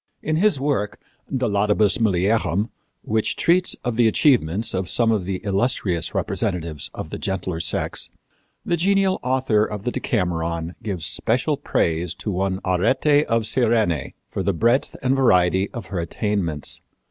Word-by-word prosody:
In 155 Hz, 0 st, 0 dB
his 195 Hz, -5 st, +3 dB
work, 135 Hz, -8 st, -1 dB, 0.3 s
De 130 Hz, -2 st, 0 dB
Laudibus 105 Hz, -1 st, +2 dB
Mulierum, 105 Hz, 0 st, +1 dB, 0.3 s
which 110 Hz, 0 st, 0 dB
treats 180 Hz, +2 st, +2 dB
of 120 Hz, -3 st, -2 dB
the 120 Hz, -2 st, +5 dB
achievements 110 Hz, -, +2 dB
of 95 Hz, -2 st, -2 dB
some 115 Hz, -2 st, +3 dB
of 105 Hz, -5 st, 0 dB
the 95 Hz, +1 st, -2 dB
illustrious 95 Hz, -5 st, +1 dB
representatives 80 Hz, -4 st, -2 dB
of -, -, -6 dB
the -, -, -5 dB
gentler 95 Hz, -3 st, -3 dB
sex, 85 Hz, -, -1 dB, 0.6 s
the 170 Hz, -, +1 dB
genial 195 Hz, +2 st, +2 dB
author 125 Hz, -4 st, +1 dB
of 105 Hz, -2 st, -4 dB
the 125 Hz, -, -1 dB
Decameron 85 Hz, -6 st, -2 dB
gives 95 Hz, -6 st, -4 dB
special -, -, 0 dB
praise 85 Hz, +1 st, -1 dB
to 105 Hz, -, -4 dB
one 95 Hz, 0 st, -1 dB
Arete 130 Hz, +11 st, +2 dB
of 115 Hz, -1 st, +1 dB
Cyrene 110 Hz, -, +1 dB
for -, -, -4 dB
the 100 Hz, +1 st, 0 dB
breadth 120 Hz, -, +1 dB
and 130 Hz, +1 st, +2 dB
variety 95 Hz, -6 st, +3 dB
of 115 Hz, -5 st, -7 dB
her 90 Hz, -, -1 dB
attainments. 85 Hz, -4 st, -2 dB
105 Hz, 150 wpm, -22 LUFS, 90-125 Hz, 0.6 s, the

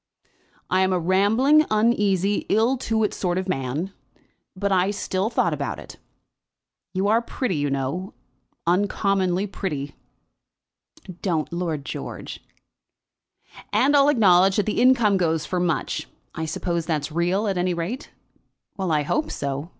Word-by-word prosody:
"I 185 Hz, -, +2 dB
am 190 Hz, 0 st, +2 dB
a 180 Hz, -, +1 dB
rambling, 215 Hz, -, +4 dB
uneasy, 205 Hz, -3 st, +1 dB
ill 225 Hz, +5 st, +3 dB
to 220 Hz, -2 st, 0 dB
do -, -, -1 dB
sort 180 Hz, -1 st, -2 dB
of 185 Hz, 0 st, -2 dB
man; 150 Hz, +4 st, -2 dB, 0.6 s
but 200 Hz, +1 st, -1 dB, 0.2 s
still 195 Hz, 0 st, -1 dB
I -, -, -2 dB
thought -, -, +1 dB
about -, -, -3 dB
it. -, -, -11 dB, 0.9 s
You 190 Hz, +1 st, 0 dB
are 225 Hz, +3 st, +3 dB
pretty, 235 Hz, -, -2 dB
you 145 Hz, 0 st, 0 dB
know, 140 Hz, +8 st, -3 dB, 0.5 s
uncommonly 190 Hz, +1 st, +1 dB
pretty." 150 Hz, -8 st, -4 dB, 1.3 s
"Don't, 170 Hz, -3 st, -1 dB
Lord 165 Hz, -5 st, -3 dB
George." -, -, -6 dB, 1.3 s
"And 285 Hz, +2 st, +3 dB
I'll 280 Hz, 0 st, +6 dB
acknowledge 190 Hz, -7 st, +5 dB
that 205 Hz, -, +1 dB
the 215 Hz, +2 st, 0 dB
income 240 Hz, -6 st, +4 dB
goes 160 Hz, -4 st, 0 dB
for 180 Hz, -, -2 dB
much. 170 Hz, -5 st, -1 dB, 0.3 s
I 160 Hz, -, -3 dB
suppose 170 Hz, +1 st, -2 dB
that's 155 Hz, -2 st, -1 dB
real 175 Hz, +6 st, 0 dB
at 190 Hz, -3 st, 0 dB
any 180 Hz, 0 st, 0 dB
rate?" 180 Hz, -, -4 dB, 0.7 s
"Well; 190 Hz, -3 st, -1 dB
I 150 Hz, -1 st, +2 dB
hope 305 Hz, -, -1 dB
so. 140 Hz, +3 st, -4 dB
185 Hz, 140 wpm, -23 LUFS, 165-210 Hz, 1.3 s, I'll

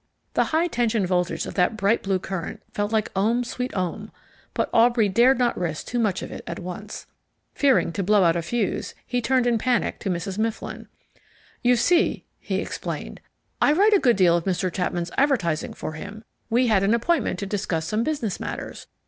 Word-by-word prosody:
The -, -, +2 dB
high 320 Hz, +2 st, +1 dB
tension 230 Hz, -, 0 dB
voltage 180 Hz, -1 st, 0 dB
of -, -, -6 dB
that 185 Hz, +4 st, +1 dB
bright 205 Hz, +3 st, +2 dB
blue 195 Hz, -1 st, 0 dB
current 185 Hz, -2 st, -5 dB
felt 205 Hz, +1 st, -1 dB
like 220 Hz, -2 st, 0 dB
ohm 225 Hz, +6 st, +2 dB
sweet 250 Hz, +1 st, -4 dB
ohm, 185 Hz, +3 st, -3 dB, 0.4 s
but -, -, +1 dB
Aubrey 230 Hz, -1 st, +4 dB
dared 240 Hz, +7 st, +4 dB
not 245 Hz, -1 st, +1 dB
risk 160 Hz, -4 st, -3 dB
too 240 Hz, -, -2 dB
much 205 Hz, -5 st, 0 dB
of -, -, -7 dB
it -, -, -7 dB
at -, -, -4 dB
once. 185 Hz, +4 st, -7 dB, 0.5 s
Fearing 270 Hz, -10 st, +3 dB
to 200 Hz, -, -2 dB
blow 205 Hz, +1 st, +4 dB
out 165 Hz, -1 st, +4 dB
a 170 Hz, -, 0 dB
fuse, 210 Hz, +5 st, -2 dB
he 245 Hz, 0 st, -1 dB
turned 255 Hz, +1 st, +2 dB
in 235 Hz, -2 st, +2 dB
panic 250 Hz, +1 st, 0 dB
to 200 Hz, -, -3 dB
Mrs. 185 Hz, +3 st, -3 dB
Mifflin. 225 Hz, 0 st, -3 dB, 0.7 s
"You 245 Hz, 0 st, +4 dB
see," 340 Hz, -, +2 dB
he -, -, -3 dB
explained, -, -, -5 dB, 0.4 s
"I 290 Hz, -, +5 dB
write 410 Hz, +6 st, +4 dB
a 405 Hz, -, +6 dB
good 245 Hz, -7 st, +4 dB
deal 180 Hz, -3 st, +4 dB
of 170 Hz, -, -1 dB
Mr. 185 Hz, -1 st, -1 dB
Chapman's 175 Hz, -2 st, -2 dB
advertising 215 Hz, -, +1 dB
for -, -, -5 dB
him. 200 Hz, +8 st, -8 dB, 0.3 s
We 240 Hz, +2 st, +3 dB
had 215 Hz, -5 st, +3 dB
an 200 Hz, +4 st, +3 dB
appointment 330 Hz, +9 st, 0 dB
to 200 Hz, -, -4 dB
discuss 185 Hz, -5 st, -2 dB
some 215 Hz, +6 st, 0 dB
business 265 Hz, -10 st, -2 dB
matters. -, -, -6 dB
215 Hz, 195 wpm, -24 LUFS, 185-245 Hz, 0.7 s, a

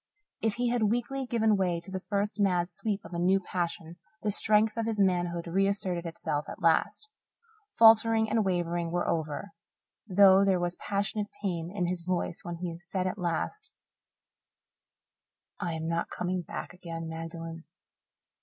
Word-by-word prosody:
If 220 Hz, -2 st, +1 dB
he 245 Hz, 0 st, 0 dB
had 235 Hz, -3 st, +2 dB
weakly 245 Hz, +3 st, -1 dB
given 220 Hz, -3 st, +3 dB
way 180 Hz, -3 st, 0 dB
to 170 Hz, +3 st, -11 dB
the 190 Hz, -, -3 dB
first 205 Hz, +2 st, -2 dB
mad 180 Hz, -3 st, +2 dB
sweep 200 Hz, +3 st, -3 dB
of -, -, -10 dB
a 170 Hz, -, -2 dB
new 185 Hz, +3 st, +3 dB
passion, 170 Hz, -2 st, -4 dB, 0.3 s
the 210 Hz, -, +1 dB
strength 215 Hz, +1 st, +3 dB
of 230 Hz, -1 st, -1 dB
his 220 Hz, -2 st, -1 dB
manhood 175 Hz, -3 st, +1 dB
reasserted 185 Hz, -1 st, 0 dB
itself 155 Hz, -2 st, -3 dB
at -, -, -8 dB
last. 165 Hz, -, +2 dB, 0.7 s
Faltering 225 Hz, 0 st, +6 dB
and 220 Hz, 0 st, +2 dB
wavering 175 Hz, -2 st, -1 dB
were 175 Hz, +1 st, -1 dB
over, 160 Hz, +4 st, -2 dB, 0.6 s
though 195 Hz, 0 st, +6 dB
there 190 Hz, -2 st, +3 dB
was 175 Hz, 0 st, +1 dB
passionate 205 Hz, +1 st, -2 dB, 0.2 s
pain 170 Hz, -4 st, -2 dB
in 190 Hz, -3 st, -1 dB
his 175 Hz, 0 st, 0 dB
voice 175 Hz, -1 st, -2 dB
when 175 Hz, -, -5 dB
he 170 Hz, -1 st, -5 dB
said 180 Hz, +1 st, -3 dB
at 185 Hz, +2 st, -2 dB
last, 410 Hz, -, -3 dB, 1.9 s
"I 170 Hz, -, -2 dB
am 160 Hz, 0 st, -4 dB
not 170 Hz, 0 st, -1 dB
coming 180 Hz, 0 st, -2 dB
back 175 Hz, -, -7 dB
again, 165 Hz, -2 st, -6 dB
Magdalen." 165 Hz, 0 st, -7 dB
185 Hz, 160 wpm, -29 LUFS, 170-205 Hz, 1.9 s, Faltering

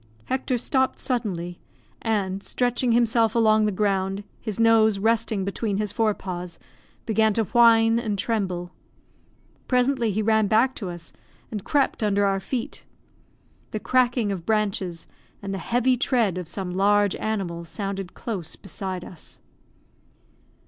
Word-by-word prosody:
Hector 260 Hz, -1 st, -1 dB
stopped 260 Hz, +2 st, 0 dB
suddenly, 185 Hz, -9 st, -3 dB, 0.4 s
and, 200 Hz, -3 st, -1 dB
stretching 245 Hz, +2 st, 0 dB
himself 230 Hz, -1 st, +3 dB
along 215 Hz, -2 st, +4 dB
the -, -, +1 dB
ground, 195 Hz, 0 st, 0 dB, 0.2 s
his 215 Hz, -2 st, -5 dB
nose 225 Hz, -2 st, +5 dB
resting 220 Hz, -1 st, +1 dB
between 200 Hz, +1 st, -2 dB
his 210 Hz, -1 st, -1 dB
forepaws, 185 Hz, -6 st, -2 dB, 0.5 s
began 220 Hz, -1 st, +2 dB
to 225 Hz, -, +1 dB
whine 230 Hz, 0 st, +5 dB
and 215 Hz, -3 st, -2 dB
tremble. 185 Hz, -5 st, -2 dB, 1.0 s
Presently 250 Hz, -2 st, +2 dB
he 215 Hz, +2 st, -1 dB
ran 220 Hz, -1 st, +3 dB
back 230 Hz, +5 st, +3 dB
to 195 Hz, -5 st, -4 dB
us, 175 Hz, -1 st, -9 dB, 0.4 s
and 210 Hz, -4 st, -4 dB
crept 280 Hz, -4 st, +1 dB
under 205 Hz, -1 st, +2 dB
our 195 Hz, -1 st, +1 dB
feet. 235 Hz, +5 st, -5 dB, 0.9 s
The 215 Hz, -, -4 dB
cracking 245 Hz, -3 st, +2 dB
of 185 Hz, -4 st, -4 dB
branches, 195 Hz, -5 st, -1 dB, 0.3 s
and 195 Hz, -1 st, -5 dB
the 195 Hz, -, -3 dB
heavy 245 Hz, +7 st, +2 dB
tread 230 Hz, -7 st, +1 dB
of 180 Hz, -, -6 dB
some 185 Hz, 0 st, -4 dB
large 205 Hz, +1 st, +3 dB
animal, 190 Hz, -6 st, -3 dB
sounded 195 Hz, +1 st, -5 dB
close 195 Hz, -9 st, -5 dB
beside 190 Hz, -2 st, -5 dB
us. 170 Hz, -, -11 dB
215 Hz, 135 wpm, -24 LUFS, 195-230 Hz, 1.0 s, nose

